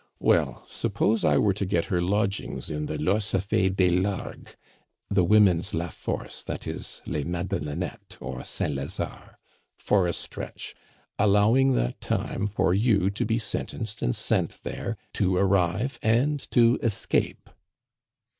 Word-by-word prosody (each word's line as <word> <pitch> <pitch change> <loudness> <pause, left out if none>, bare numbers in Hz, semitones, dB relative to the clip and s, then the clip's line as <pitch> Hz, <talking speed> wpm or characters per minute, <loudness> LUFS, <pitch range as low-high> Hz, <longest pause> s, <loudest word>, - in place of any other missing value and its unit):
"Well, - - +2
suppose 110 +1 0
I 75 -2 +4
were 100 +3 +3
to 100 - -3
get 90 -3 0
her 90 - +2
lodgings 100 0 -1
in 75 0 -3
the 75 - -3
Lorcefe 95 +2 +1
des 90 -2 +4
Largues" 95 +2 -2 0.6
(the 95 -2 +4
women's 95 -1 +4
La 85 +1 -2
Force, - - -5
i. - - -2
e. - - -5 0.3
les 75 - -2
Madelonnettes 85 +3 -4
or 65 0 -6
Saint 75 - -2
Lazare) 70 +1 -5 0.4
"for 95 -4 +2
a 85 - 0
stretch, - - -6 0.5
allowing 105 +6 +4
that - - -1
time 105 - -1
for 100 -3 +1
you 100 -2 +3
to 100 - -2
be 110 0 +1
sentenced 120 - -4
and - - +1
sent - - -1
there, 115 -2 -4 0.2
to 95 -2 +1
arrive 100 +6 +1
and 130 +6 +1
to 120 -1 +4
escape?" 110 -4 0
95 Hz, 140 wpm, -26 LUFS, 85-105 Hz, 0.6 s, I